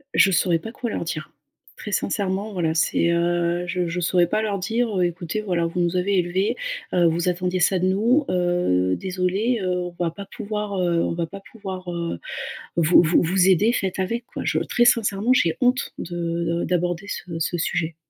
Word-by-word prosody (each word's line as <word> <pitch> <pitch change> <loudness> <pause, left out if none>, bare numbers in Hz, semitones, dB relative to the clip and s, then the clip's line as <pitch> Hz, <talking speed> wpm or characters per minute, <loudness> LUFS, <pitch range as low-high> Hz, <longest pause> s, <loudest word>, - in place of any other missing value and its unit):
Je 195 - +6
saurais 175 -1 +3
pas 225 - -8
quoi 240 -1 -4
leur - - -3
dire. 160 -2 -5 0.5
Très - - -7
sincèrement, 200 +1 -1
voilà, 170 -5 0
c'est, 165 +1 +2
heu, 170 0 +1
je 180 -1 -1
je 175 +2 -3
saurais 175 +1 +3
pas 215 - 0
leur 205 -3 -1
dire: 225 +5 0
«Heu, 180 - +3
écoutez, 175 +3 -3
voilà, 175 -5 0
vous 165 +2 -3
nous 175 +1 +1
avez 195 +2 +1
élevés, 185 - 0 0.4
heu, 175 -1 +4
vous 170 +2 +1
attendiez 180 0 -1
ça 185 +2 +3
de 185 - +1
nous. 230 +10 +2
Heu, 175 - +1
désolée, 190 +5 -1
heu, 180 -1 0
on 175 -1 -7
va 165 - 0
pas 200 +4 -9
pouvoir, 210 0 -4
heu, 170 -1 +2
on - - -1
va 170 0 -1
pas 195 +4 -9
pouvoir, 190 -4 -7
heu, 170 - -3 0.6
vous 170 +1 +6
vous 170 0 +3
vous 180 +2 +3
aider, 200 +5 +4
faites 190 -5 -2
avec, 230 +6 -2
quoi». - - -7
Je - - +1
très 240 - +1
sincèrement, 220 -1 +3
j'ai 170 -10 +3
honte 250 +1 +1
de 175 +1 -5
de 170 0 -1
d'aborder 175 +2 -1
ce 170 -4 -5
ce 175 +2 -1
sujet. 160 0 -1
180 Hz, 200 wpm, -23 LUFS, 170-200 Hz, 0.6 s, Je